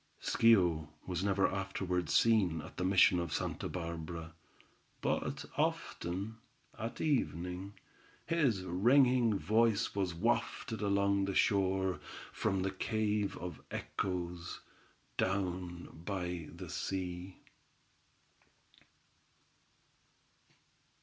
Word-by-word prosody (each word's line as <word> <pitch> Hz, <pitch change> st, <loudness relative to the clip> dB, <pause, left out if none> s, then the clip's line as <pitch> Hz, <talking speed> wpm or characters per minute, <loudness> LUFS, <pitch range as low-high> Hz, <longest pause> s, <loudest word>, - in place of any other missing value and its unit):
Schio 90 Hz, -9 st, +4 dB, 0.2 s
was 90 Hz, -1 st, -2 dB
never 100 Hz, -1 st, +3 dB
afterward 95 Hz, -3 st, -2 dB
seen 100 Hz, -8 st, +4 dB
at -, -, -11 dB
the -, -, -1 dB
mission 95 Hz, -1 st, +5 dB
of 85 Hz, -2 st, -3 dB
Santa -, -, -2 dB
Barbara, 85 Hz, -1 st, -5 dB, 0.7 s
but -, -, -1 dB
often, 100 Hz, +6 st, -1 dB, 0.4 s
at 115 Hz, +1 st, -5 dB
evening, 95 Hz, -, -1 dB, 0.5 s
his 135 Hz, -, +2 dB
ringing 120 Hz, +4 st, +4 dB
voice 110 Hz, 0 st, +2 dB
was 95 Hz, -4 st, -1 dB
wafted 115 Hz, +3 st, 0 dB
along 100 Hz, -1 st, +2 dB
the 100 Hz, -1 st, -2 dB
shore, 95 Hz, -3 st, +2 dB, 0.3 s
from 95 Hz, -3 st, 0 dB
the 95 Hz, -, 0 dB
cave 105 Hz, 0 st, 0 dB
of 85 Hz, -3 st, -6 dB
echoes, 90 Hz, -2 st, -3 dB, 0.6 s
down 90 Hz, -2 st, -1 dB, 0.2 s
by 90 Hz, -4 st, -3 dB
the -, -, -8 dB
sea. 90 Hz, -1 st, -4 dB
95 Hz, 90 wpm, -34 LUFS, 90-105 Hz, 0.7 s, mission